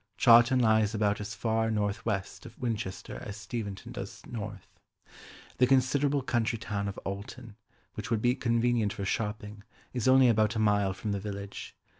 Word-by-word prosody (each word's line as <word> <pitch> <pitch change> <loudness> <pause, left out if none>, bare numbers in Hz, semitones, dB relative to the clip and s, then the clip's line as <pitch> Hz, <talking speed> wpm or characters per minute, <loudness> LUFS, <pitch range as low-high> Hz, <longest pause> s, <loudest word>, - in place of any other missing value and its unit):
Chawton 120 +2 +6
lies 110 -2 +3
about 105 -1 +1
as 105 +2 -6
far 110 -1 0
north 105 0 -1
west 100 +1 -3
of 115 - -15
Winchester 110 -6 -4
as 105 0 -7
Steventon 110 -1 -6
does 120 0 -7
north. 105 -4 -6 0.9
The 125 - +5
considerable 135 +2 +2
country 115 -2 0
town 100 -2 -3
of 100 - -5
Alton, 105 +3 -7 0.4
which - - -6
would 115 -2 +1
be 120 +3 +3
convenient 115 -3 +1
for 100 - -5
shopping, 105 0 -3 0.3
is 125 -2 -1
only 130 0 +7
about 110 -1 +3
a - - -1
mile 105 -3 +2
from 105 +2 -4
the 100 - -1
village. 100 0 -7
110 Hz, 165 wpm, -29 LUFS, 100-120 Hz, 0.9 s, only